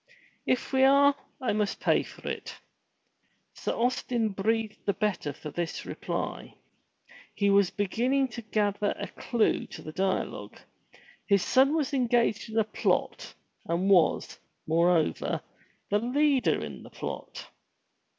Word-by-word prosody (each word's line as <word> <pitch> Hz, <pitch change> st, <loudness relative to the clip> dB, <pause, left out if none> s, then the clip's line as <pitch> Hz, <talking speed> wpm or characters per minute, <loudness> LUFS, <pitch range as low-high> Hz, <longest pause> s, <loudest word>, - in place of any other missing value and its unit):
"If 255 Hz, +1 st, 0 dB
we 265 Hz, 0 st, +4 dB
are, 280 Hz, +1 st, +6 dB, 0.3 s
I 255 Hz, -, 0 dB
must 210 Hz, -1 st, -1 dB
pay -, -, +3 dB
for -, -, -11 dB
it." -, -, -5 dB, 1.0 s
Sir -, -, -3 dB
Austin 240 Hz, -1 st, 0 dB
breathed 215 Hz, +2 st, -1 dB
the 200 Hz, -, +2 dB
better 200 Hz, -7 st, -1 dB
for 150 Hz, +2 st, -8 dB
this 170 Hz, 0 st, -4 dB
reply. -, -, -4 dB, 0.8 s
He 200 Hz, -1 st, +2 dB
was 200 Hz, -2 st, +4 dB
begin 210 Hz, +5 st, -1 dB
ning 275 Hz, 0 st, +3 dB
to 235 Hz, +1 st, -7 dB
gather 210 Hz, -2 st, 0 dB
a -, -, -4 dB
clue 235 Hz, -3 st, 0 dB
to -, -, -10 dB
the 155 Hz, -, -7 dB
dialogue. 190 Hz, +3 st, -2 dB, 0.7 s
His 200 Hz, -3 st, +3 dB
son 270 Hz, +3 st, +4 dB
was 295 Hz, -3 st, -1 dB
engaged 240 Hz, -4 st, +1 dB
in 220 Hz, -, -4 dB
a 220 Hz, -, +5 dB
plot, 210 Hz, -, -1 dB, 0.3 s
and 180 Hz, +4 st, +1 dB
was, 175 Hz, -5 st, +3 dB, 0.3 s
moreover, 165 Hz, -, +2 dB, 0.5 s
the 205 Hz, -, +3 dB
leader 270 Hz, +3 st, +2 dB
in -, -, -8 dB
the -, -, -12 dB
plot. -, -, -7 dB
215 Hz, 140 wpm, -28 LUFS, 195-250 Hz, 1.0 s, are